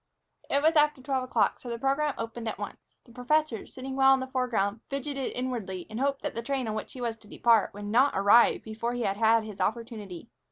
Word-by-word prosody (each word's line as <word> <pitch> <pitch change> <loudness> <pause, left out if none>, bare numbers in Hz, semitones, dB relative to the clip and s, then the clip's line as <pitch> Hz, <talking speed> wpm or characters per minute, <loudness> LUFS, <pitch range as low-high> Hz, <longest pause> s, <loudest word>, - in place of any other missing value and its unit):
It 280 +1 +1
was 320 +1 +4
after 300 -1 +4
twelve 260 0 -2
o'clock, 225 -5 +1
so 245 - -9
the 235 - -3
program 275 +3 0
opened 230 0 -5
at - - -3
once. - - -9
The 240 - -18
professor, 250 0 0
sitting 265 +1 -7
well 270 0 +6
in - - -3
the 260 - -3
foreground, 240 -5 -1
fidgeted 275 -1 -3
inwardly 225 -8 -4
and 220 - -4
hoped 275 +1 0
that - - -3
the 230 - -3
train 265 0 -2
on 215 - -2
which 215 - -5
he 255 - -8
was 230 -2 -2
to 215 - -19
depart 225 0 +3
would 205 0 -7
not 240 +6 +3
arrive 205 +4 +5
before 225 +2 -3
he 245 -1 -2
had 195 -1 -1
had 225 0 +4
his 215 -2 -9
opportunity. 220 -3 -4
240 Hz, 230 wpm, -28 LUFS, 220-270 Hz, -, well